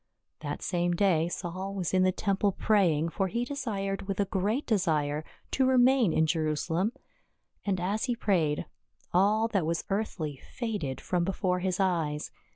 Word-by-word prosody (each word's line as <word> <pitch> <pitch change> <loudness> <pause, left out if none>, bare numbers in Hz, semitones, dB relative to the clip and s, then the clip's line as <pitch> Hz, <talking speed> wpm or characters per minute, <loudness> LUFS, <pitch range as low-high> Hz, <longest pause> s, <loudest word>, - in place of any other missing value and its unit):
That - - -5
same 175 -1 0
day 170 -4 +3
Saul 185 +3 -4
was 185 -3 -2
in 185 - +4
the 185 0 +4
temple 200 +1 +1
praying, 170 -8 +2
for 195 +3 -1
he 235 +6 -1
desired 200 -8 -3
with 195 -1 -3
a 200 - +3
great 205 +9 -1
desire 155 -8 +1 0.3
to 265 -1 +2
remain 255 -5 +5
in 160 - +3
Jerusalem. 160 +5 0 0.8
And 190 -2 +1
as 200 +5 -1
he 245 -2 0
prayed, 165 -10 +1 0.5
all 210 +5 +4
that 195 -6 +1
was 165 0 -1
earthly 180 -8 -2
faded 205 - -4
from 180 -1 0
be 190 +2 -1
fore 180 -2 0
his 185 0 -1
eyes. 165 -6 0
190 Hz, 160 wpm, -29 LUFS, 170-210 Hz, 0.8 s, remain